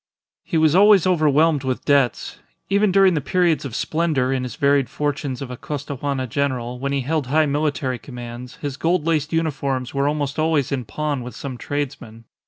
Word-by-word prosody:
He 165 Hz, -, -2 dB
was 155 Hz, -1 st, +4 dB
always 200 Hz, 0 st, +6 dB
overwhelmed 155 Hz, -4 st, +3 dB
with 130 Hz, -1 st, -3 dB
debts; 140 Hz, -4 st, +1 dB, 0.3 s
even 200 Hz, 0 st, +3 dB
during 195 Hz, -1 st, +5 dB
the 150 Hz, -, 0 dB
periods 170 Hz, 0 st, +1 dB
of 125 Hz, -4 st, -6 dB
splendour 155 Hz, -6 st, 0 dB
in 130 Hz, -, -1 dB
his 125 Hz, -1 st, -5 dB
varied 140 Hz, -3 st, +2 dB
fortunes 145 Hz, -3 st, -3 dB
of 130 Hz, -, -7 dB
a 125 Hz, -, -6 dB
Costaguana 140 Hz, -1 st, -4 dB
general, 125 Hz, -1 st, -2 dB
when 140 Hz, +1 st, -2 dB
he 140 Hz, -1 st, 0 dB
held 150 Hz, 0 st, -1 dB
high 155 Hz, +4 st, +3 dB
military 145 Hz, -3 st, -1 dB
commands, 120 Hz, -1 st, -9 dB
his 145 Hz, -2 st, -5 dB
gold 165 Hz, -1 st, +1 dB
laced 155 Hz, -2 st, 0 dB
uniforms 140 Hz, -6 st, -1 dB
were 140 Hz, 0 st, +1 dB
almost 145 Hz, -1 st, -2 dB
always 155 Hz, -4 st, +1 dB
in 130 Hz, -3 st, -2 dB
pawn 145 Hz, +4 st, -3 dB
with 125 Hz, 0 st, -8 dB
some 135 Hz, -3 st, -6 dB
tradesman. 125 Hz, -5 st, -5 dB
140 Hz, 185 wpm, -21 LUFS, 130-155 Hz, 0.3 s, always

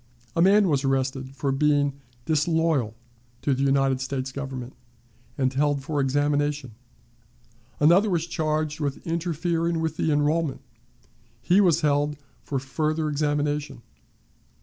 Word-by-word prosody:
A 165 Hz, -, +2 dB
man 200 Hz, +2 st, +5 dB
was 145 Hz, -4 st, +1 dB
arrested 135 Hz, 0 st, -1 dB
for 135 Hz, 0 st, -1 dB
being 145 Hz, 0 st, +2 dB, 0.3 s
"disloyal" 155 Hz, -6 st, +1 dB, 0.5 s
to 140 Hz, -, +2 dB
the 130 Hz, -, -2 dB
United 135 Hz, -1 st, +2 dB
States 130 Hz, 0 st, -3 dB
Government, 130 Hz, -2 st, -6 dB, 0.6 s
and 130 Hz, -1 st, +1 dB
held 145 Hz, 0 st, +1 dB
for 145 Hz, 0 st, -1 dB
examination. 145 Hz, 0 st, 0 dB, 1.1 s
Another 175 Hz, +8 st, +5 dB
was 170 Hz, -3 st, 0 dB
charged 155 Hz, -2 st, -2 dB
with 140 Hz, -3 st, -3 dB
interfering 170 Hz, 0 st, -1 dB
with 160 Hz, -1 st, -2 dB
the 160 Hz, -, +1 dB
enrollment; 150 Hz, 0 st, +1 dB, 0.8 s
he 185 Hz, +3 st, +3 dB
was 175 Hz, -6 st, +3 dB
held 145 Hz, 0 st, +1 dB, 0.2 s
for 140 Hz, -, -3 dB
further 155 Hz, +4 st, -1 dB
examination. 145 Hz, -2 st, -1 dB
145 Hz, 125 wpm, -25 LUFS, 135-160 Hz, 1.1 s, man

